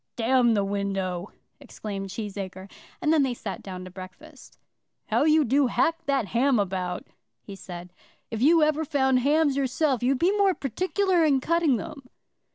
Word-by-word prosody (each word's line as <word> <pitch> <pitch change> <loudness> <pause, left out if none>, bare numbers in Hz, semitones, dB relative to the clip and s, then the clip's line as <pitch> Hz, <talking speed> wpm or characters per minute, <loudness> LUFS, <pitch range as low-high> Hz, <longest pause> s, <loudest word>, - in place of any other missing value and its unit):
"D 235 - -4 0.3
the 200 -2 +1
window," 195 -2 -3 0.3
exclaimed 195 -2 -7
Cheesacre, 195 -1 -6 0.3
and 310 - +3
then 315 - +4
they 260 -3 0
sat 210 -4 -6
down 185 -1 -8
to 185 - -10
breakfast. 195 - -13 0.5
"How - - +2
you 310 -1 +4
do 270 +3 +3
hack 330 +6 0
that 270 -7 0
ham 255 +2 +2
about," 185 -3 -2 0.4
he 195 - -9
said. 180 -2 -10 0.4
"If 225 -1 -4
you 320 +4 +5
ever 305 +1 +1
found 265 -4 +2
hams 290 +2 +2
yourself 270 -1 0
you'd 255 +2 +2
be 365 +8 +2
more 395 -3 +3
particular 365 - 0
in 285 -4 +3
cutting 330 -1 +2
them." 290 -5 -9
260 Hz, 165 wpm, -26 LUFS, 195-305 Hz, 0.5 s, you